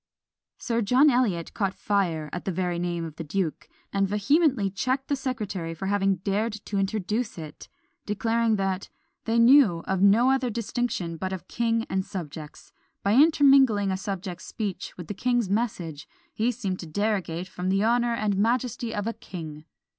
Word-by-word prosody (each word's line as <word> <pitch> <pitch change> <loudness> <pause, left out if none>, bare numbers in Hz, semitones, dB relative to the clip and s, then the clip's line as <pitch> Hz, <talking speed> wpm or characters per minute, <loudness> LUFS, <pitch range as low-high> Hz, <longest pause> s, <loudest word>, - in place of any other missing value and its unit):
Sir 235 -1 -1
John 255 +7 +5
Eliot 210 -10 0
caught 195 -3 -1
fire 175 -7 0
at 175 - -5
the 195 - 0
very 175 -1 -1
name 175 -1 -2
of 155 -2 -9
the 165 - -4
duke, 160 +1 -3 0.2
and 195 0 +2
vehemently 210 - +2
checked 260 +7 -1
the 285 - +2
secretary 210 - -4
for 180 - -6
having 195 0 +2
dared 205 +5 -1
to 200 - -2
introduce 210 +3 -1
it; 155 -2 -9 0.4
declaring, 225 +2 +1
that 195 -1 -2 0.4
"they 225 +1 +1
knew 235 -8 +6
of 190 -1 -1
no 220 +6 +5
other 265 -2 +1
distinction 230 -6 -2
but 185 +3 -3
of 190 -2 -6
king 230 -1 0
and 190 0 -1
subjects. 155 -5 -8 0.3
By 200 - +2
intermingling 270 -8 +5
a - - 0
subject's 190 -2 -5
speech 205 -4 -5
with 175 - -7
the 185 - -5
king's 240 -1 0
message, 180 -9 -2 0.3
he 230 +3 +1
seemed 195 -6 -4
to 170 - -7
derogate 185 -2 -1
from 180 0 -4
the 195 +2 +2
honour 235 +1 +2
and 210 -3 0
majesty 235 +1 0
of 205 -1 -2
a 230 - -1
king. 160 -9 -9
200 Hz, 170 wpm, -26 LUFS, 185-235 Hz, 0.4 s, knew